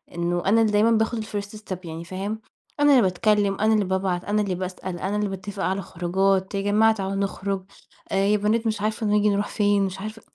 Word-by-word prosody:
إنه 175 0 -1
أنا 225 +4 +4
اللي 220 -2 +2
دايمًا 215 +3 +4
باخد 220 0 +1
الfirst 205 0 -5
step 200 -3 -6
يعني 165 0 -6
فاهم، 200 +4 -4 0.4
أنا 290 0 +5
اللي 265 -3 +6
باتكلم 200 +1 +2
أنا 220 +1 +3
اللي 210 -2 +2
بابعت 185 -1 -1
أنا 210 +1 +1
اللي 195 -3 -1
باسأل 185 -1 -5
أنا 195 +3 -2
اللي 210 -1 0
باتفق 195 +1 -5
على 190 +1 0
الخروجات 190 +2 0
"يا 195 - 0
جماعة 210 +2 +4
تعالوا 195 -2 -3
نخرج"، 195 -1 -2 0.5
"آآ - - 0
يا 210 +1 +3
بنات 220 +3 +1
مش 215 -2 -1
عارفة 215 +1 -1
نيجي 210 0 +3
نروح 205 0 0
فين" 205 -2 +2
مش 190 0 -5
عارفة 215 +1 -7
200 Hz, 215 wpm, -24 LUFS, 190-215 Hz, 0.5 s, اللي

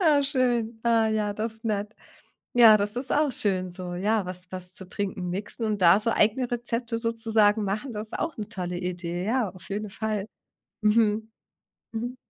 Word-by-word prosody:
ah, 310 -5 +5
schön, 240 -5 0
ah, 230 -1 +3
ja, 215 -1 0
das 220 +2 -3
ist 220 +1 -18
nett, 210 -1 -2 0.6
ja, 230 -3 +8
das 205 +1 +2
ist 255 +3 -1
auch 295 -2 +2
schön 185 -5 0
so, 180 0 -6
ja, 205 +2 0
was 180 0 -5
was 185 0 -2
zu 190 - -7
Trinken 190 -2 -3
mixen 205 +5 -4
und 210 -2 -1
da 170 +2 +7
so 215 +2 0
eigene 230 +3 +2
Rezepte 235 -1 -2
sozusagen 225 -2 +2
machen, 210 +7 -3
das 215 0 -5
ist - - -4
auch 330 - -2
'ne 215 -1 -6
tolle 180 -4 -3
Idee, 175 0 -3
ja, 235 0 +1
auf 185 0 -13
jeden 210 +2 -3
Fall. 210 0 -3 0.6
Mhm. 215 0 +2 0.6
Mhm. 240 +3 -4
215 Hz, 185 wpm, -26 LUFS, 195-230 Hz, 0.6 s, ja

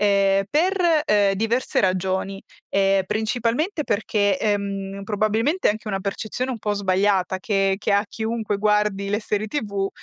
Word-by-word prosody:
ehm, 195 -1 +3
per, 340 0 +2
ehm, 205 -2 +3
diverse 225 +5 0
ragioni. 190 +1 -1 0.3
Ehm, 195 0 +3
principalmente 240 - -1
perché, 205 -2 +1
ehm, 200 -1 -2
probabilmente 220 - +1
è - - +5
anche 215 0 -8
una 195 -1 -2
percezione 215 +6 -3
un 245 - -4
po' 210 -1 -1
sbagliata 190 -1 +1
che 195 -1 +1
che 210 - -1
ha 200 +1 +3
chiunque 220 -1 -2
guardi 210 -1 +1
le 210 +1 0
serie 210 0 -2
TV, 200 -8 -2
205 Hz, 150 wpm, -23 LUFS, 195-220 Hz, 0.3 s, è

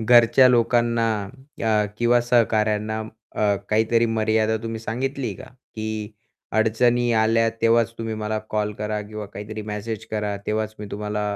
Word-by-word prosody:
घरच्या 120 +3 +6
लोकांना 120 -1 +2 0.6
अ, 110 -1 +3
किंवा 120 +1 +4
सहकाऱ्यांना 110 -3 +1 0.4
अ, 105 -1 +2
काहीतरी 115 +2 +3
मर्यादा 110 0 +1
तुम्ही 115 0 -4
सांगितली 125 +2 -3
का? - - -10 0.3
की 110 -1 -4 0.4
अडचणी 120 +2 +3
आल्या 115 +1 +3
तेव्हाच 115 0 +3
तुम्ही 115 -1 -3
मला 110 0 -2
कॉल 105 0 -1
करा 105 0 -2
किंवा 105 0 -7
काहीतरी 105 +2 -7
मॅसेज 105 +1 -5
करा, 105 -1 -2
तेव्हाच 110 0 -1
मी 105 - -6
तुम्हाला 105 0 -3
110 Hz, 135 wpm, -23 LUFS, 105-115 Hz, 0.6 s, घरच्या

